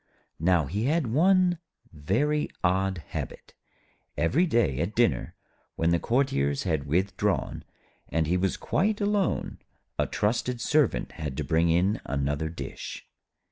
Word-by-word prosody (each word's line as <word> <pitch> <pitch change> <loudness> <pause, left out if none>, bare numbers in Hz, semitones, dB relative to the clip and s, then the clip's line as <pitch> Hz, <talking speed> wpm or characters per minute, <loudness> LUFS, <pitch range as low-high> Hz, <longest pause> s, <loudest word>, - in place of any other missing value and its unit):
Now 85 -1 +3
he 100 - -2
had 145 -5 +1
one 180 +2 +4 0.3
very 120 - 0
odd 95 -1 +1
habit. - - -6 0.6
Every 150 - +2
day 115 - +2
at 85 +7 -2
dinner, 120 -1 +1 0.4
when 80 +1 +1
the 85 - +3
courtiers 70 - +1
had 80 -6 -1
withdrawn, 95 0 0 0.5
and 80 +3 +1
he 85 +4 +1
was 95 +1 0
quite 210 +2 0
alone, 205 -2 0 0.4
a - - +2
trusted 120 +3 -1
Servant 145 +2 +1
had 75 -4 -5
to - - -1
bring 80 +1 +2
in 90 +5 +2
another 70 +3 -1
dish. 85 - -7
95 Hz, 135 wpm, -27 LUFS, 80-135 Hz, 0.6 s, one